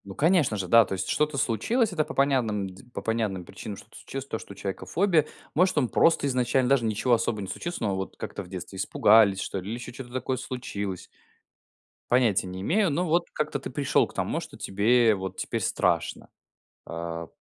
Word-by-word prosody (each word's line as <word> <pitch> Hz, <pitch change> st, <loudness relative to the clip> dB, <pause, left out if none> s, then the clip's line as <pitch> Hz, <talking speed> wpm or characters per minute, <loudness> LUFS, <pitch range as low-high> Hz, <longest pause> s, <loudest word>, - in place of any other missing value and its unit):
Ну 95 Hz, -1 st, -9 dB
конечно 155 Hz, -, +3 dB
же. 95 Hz, -2 st, -3 dB
Да. 115 Hz, +4 st, +7 dB
То -, -, -5 dB
есть 95 Hz, 0 st, -3 dB
что-то 150 Hz, -1 st, +1 dB
случилось- 190 Hz, -, +1 dB
это 155 Hz, -3 st, +1 dB
по -, -, -8 dB
понядным 120 Hz, -8 st, +1 dB
дз 95 Hz, 0 st, -13 dB
по -, -, -4 dB
понятным 110 Hz, -5 st, -1 dB
причинам, 100 Hz, +3 st, -8 dB
что-то -, -, -15 dB
случилось- 135 Hz, 0 st, -6 dB
то, 110 Hz, -, -3 dB
что -, -, -10 dB
у -, -, -17 dB
человека 95 Hz, 0 st, -5 dB
фобия. 170 Hz, -5 st, +2 dB, 0.3 s
Может, 180 Hz, +1 st, +3 dB
он 130 Hz, -5 st, +2 dB
просто 165 Hz, -3 st, +3 dB
изначально 125 Hz, 0 st, +1 dB
даже 135 Hz, -4 st, +3 dB
ничего 110 Hz, +3 st, +1 dB
особо 110 Hz, -2 st, +1 dB
не 95 Hz, -, -5 dB
случилось. 175 Hz, -, -5 dB
Но 100 Hz, -3 st, 0 dB
вот 95 Hz, 0 st, -5 dB
как-то -, -, -5 dB
в -, -, -13 dB
детстве 95 Hz, +1 st, -7 dB
испугались, 100 Hz, +1 st, +4 dB
что 100 Hz, -, -3 dB
ли, 95 Hz, -, -9 dB
или 115 Hz, -, -2 dB
ещё 120 Hz, -, -8 dB
чё-то 120 Hz, 0 st, -9 dB
такое 130 Hz, +1 st, -2 dB
случилось. 100 Hz, -7 st, -5 dB, 1.1 s
Понятия 120 Hz, -7 st, +3 dB
не 90 Hz, 0 st, -6 dB
имею. 190 Hz, -, +2 dB
Но 175 Hz, +5 st, 0 dB
вот 170 Hz, +2 st, +1 dB
как-то 150 Hz, -1 st, -2 dB
ты 135 Hz, -, -7 dB
пришёл 140 Hz, +1 st, +2 dB
к -, -, -14 dB
тому, -, -, -1 dB
что -, -, -10 dB
тебе 110 Hz, +3 st, +3 dB
вот 95 Hz, -1 st, -5 dB
теперь -, -, -2 dB
страшно, -, -, 0 dB, 0.6 s
а, 85 Hz, 0 st, -5 dB
115 Hz, 205 wpm, -27 LUFS, 100-140 Hz, 1.1 s, Да